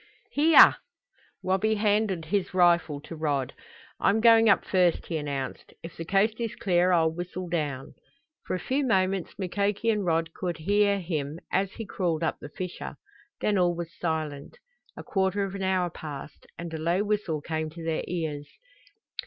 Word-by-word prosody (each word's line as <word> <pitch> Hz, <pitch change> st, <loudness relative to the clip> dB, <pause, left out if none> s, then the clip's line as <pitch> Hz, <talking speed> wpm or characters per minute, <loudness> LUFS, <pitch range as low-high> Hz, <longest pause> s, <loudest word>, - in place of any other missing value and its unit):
"Here!" 310 Hz, +2 st, +7 dB, 0.7 s
Wabi 195 Hz, +4 st, +1 dB
handed 205 Hz, -4 st, +1 dB
his 190 Hz, +1 st, -1 dB
rifle 170 Hz, -5 st, +3 dB
to 165 Hz, -, -9 dB
Rod. 145 Hz, -4 st, -1 dB, 0.5 s
"I'm 205 Hz, +3 st, +3 dB
going 225 Hz, -1 st, +6 dB
up 200 Hz, -, +4 dB
first," 180 Hz, -3 st, +2 dB
he 165 Hz, -, -3 dB
announced. 140 Hz, -3 st, -5 dB
"If 165 Hz, 0 st, -9 dB
the 165 Hz, -, -6 dB
coast 205 Hz, +5 st, +2 dB
is 230 Hz, -2 st, -3 dB
clear 180 Hz, -1 st, +2 dB
I'll 165 Hz, -2 st, +3 dB
whistle 180 Hz, +1 st, -5 dB
down." 150 Hz, -6 st, -3 dB, 0.5 s
For -, -, -1 dB
a -, -, -3 dB
few 275 Hz, +8 st, -1 dB
moments 190 Hz, -6 st, 0 dB
Mukoki 200 Hz, +4 st, 0 dB
and 210 Hz, -2 st, -1 dB
Rod 165 Hz, -2 st, 0 dB
could 175 Hz, -2 st, -3 dB
hear 200 Hz, +4 st, +2 dB
him 155 Hz, -4 st, -3 dB
as 190 Hz, 0 st, 0 dB
he 225 Hz, -, -6 dB
crawled 170 Hz, -5 st, -1 dB
up 160 Hz, -, -1 dB
the 145 Hz, -, -9 dB
fissure. 180 Hz, +3 st, -6 dB, 0.5 s
Then 205 Hz, -2 st, +2 dB
all 175 Hz, -1 st, +2 dB
was 170 Hz, -1 st, -6 dB
silent. 155 Hz, -, -4 dB, 0.4 s
A -, -, -7 dB
quarter 195 Hz, +1 st, 0 dB
of 195 Hz, -1 st, -4 dB
an 195 Hz, -, -5 dB
hour 185 Hz, -2 st, +1 dB
passed, 150 Hz, -2 st, -9 dB
and 170 Hz, -1 st, -6 dB
a 160 Hz, -, -4 dB
low 170 Hz, +5 st, +1 dB
whistle 205 Hz, -7 st, -1 dB
came 155 Hz, +1 st, -3 dB
to 165 Hz, +1 st, -10 dB
their 160 Hz, -1 st, -1 dB
ears. 155 Hz, -4 st, -3 dB
180 Hz, 170 wpm, -27 LUFS, 160-200 Hz, 0.7 s, Here